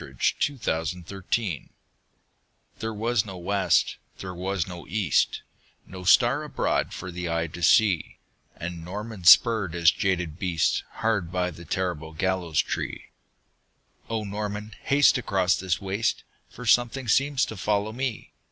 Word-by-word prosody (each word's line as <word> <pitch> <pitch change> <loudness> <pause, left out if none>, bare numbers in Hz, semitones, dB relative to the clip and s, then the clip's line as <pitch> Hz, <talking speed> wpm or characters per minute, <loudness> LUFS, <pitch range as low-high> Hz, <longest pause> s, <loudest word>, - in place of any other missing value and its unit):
Y - - -9
Z - - -16 0.4
The - - -17
Demon 80 +2 -1
of - - -20
the 95 +2 -8
Gibbet 95 - -1 1.1
THERE 110 0 -3
was 115 0 +1
no 95 -3 -8
west, 95 +3 +1 0.2
there 95 -1 -6
was 90 -1 -2
no 90 -2 -9
east, 95 - +1 0.4
No 95 -1 -9
star 90 - +5
abroad - - -1
for 90 - -7
eye 85 -2 -2
to 85 +2 -9
see; 95 +1 +3 0.4
And 85 0 -6
Norman 100 +1 -7
spurred 105 -3 +6
his 85 -1 +5
jaded 90 -5 -1
beast 85 -4 +1
Hard 105 -7 -1
by 90 -1 -1
the 85 +1 -12
terrible 80 -2 -3
gallows 90 -2 0
tree. - - -5 1.0
"O 110 -1 -2
Norman, 105 +1 -5
haste 140 -2 +4
across 95 -6 +1
this 90 -2 -1
waste 100 +3 -1 0.3
For 125 - -10
something 120 +3 +2
seems 135 +3 +2
to 110 - -7
follow 105 +3 -1
me!" 130 -2 -4
95 Hz, 150 wpm, -26 LUFS, 85-110 Hz, 1.1 s, spurred